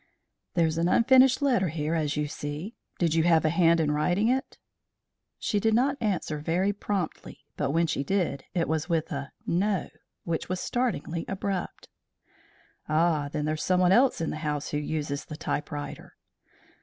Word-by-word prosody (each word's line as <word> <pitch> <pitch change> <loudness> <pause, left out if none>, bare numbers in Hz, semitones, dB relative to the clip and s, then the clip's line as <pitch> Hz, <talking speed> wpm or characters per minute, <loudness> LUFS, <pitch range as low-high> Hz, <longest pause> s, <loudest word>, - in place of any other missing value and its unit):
"There's 165 -2 +2
an 170 - +2
unfinished 260 +5 +5
letter 240 -9 +3
here, 155 0 -2
as 150 -3 0
you 150 0 0
see. 145 +8 -5 0.2
Did 170 -3 +1
you 165 - +3
have 165 -2 +4
a - - +4
hand 170 -1 +4
in 155 -2 +2
writing 175 +9 +1
it?" 265 +1 -1 0.8
She 210 - 0
did 220 +1 +2
not 265 +4 +2
answer 185 -8 -1
very 180 +6 0
promptly, 200 -4 -4
but 145 - -1
when 165 +4 +2
she 155 -3 -1
did, 175 -5 -1
it 170 -2 +1
was 160 0 -1
with 165 +1 0
a 140 -2 -4
"No" 195 +2 0 0.3
which 170 -1 -3
was 185 0 -1
startlingly 200 - -2
abrupt. 195 -1 -4 1.0
"Ah! 155 -2 +2
then 150 - -2
there's 155 0 -1
someone 180 -1 +3
else 245 -1 +4
in 165 - -1
the - - -4
house 150 -2 -3
who 150 - 0
uses 150 -1 -3
the 155 - -8
typewriter." 150 -1 -5
165 Hz, 170 wpm, -27 LUFS, 150-195 Hz, 1.0 s, unfinished